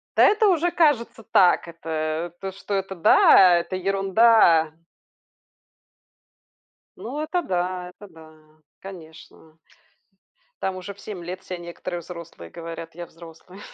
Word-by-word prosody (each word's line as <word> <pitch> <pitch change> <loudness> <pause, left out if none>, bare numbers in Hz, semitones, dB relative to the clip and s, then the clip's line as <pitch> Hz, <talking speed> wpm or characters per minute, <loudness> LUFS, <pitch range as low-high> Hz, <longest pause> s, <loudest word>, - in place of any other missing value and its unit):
Да, - - +5
это 425 +1 +4
уже 350 -1 +2
кажется 285 -9 +1
так. 190 -5 +3
Это, 160 0 -4
то, 195 0 -5
что 195 +2 -7
это, 195 0 -3
да, 180 +1 +6
это 170 +2 -5
ерунда. 195 -3 +3 2.2
Ну, 265 +6 -7
это 350 +3 -1
да, 180 - -3
это 205 +3 -15
да, 155 -2 -19 0.2
конечно. 160 -3 -13 1.0
Там 190 - -2
уже 185 +2 -8
в 200 - -23
7 200 -5 -8
лет 180 +2 -7
все 185 -1 -7
некоторые 175 +1 -7
взрослые 170 - -11
говорят: 165 -1 -9
"Я 175 0 -7
взрослый". 170 +3 -15
180 Hz, 125 wpm, -23 LUFS, 165-195 Hz, 2.2 s, да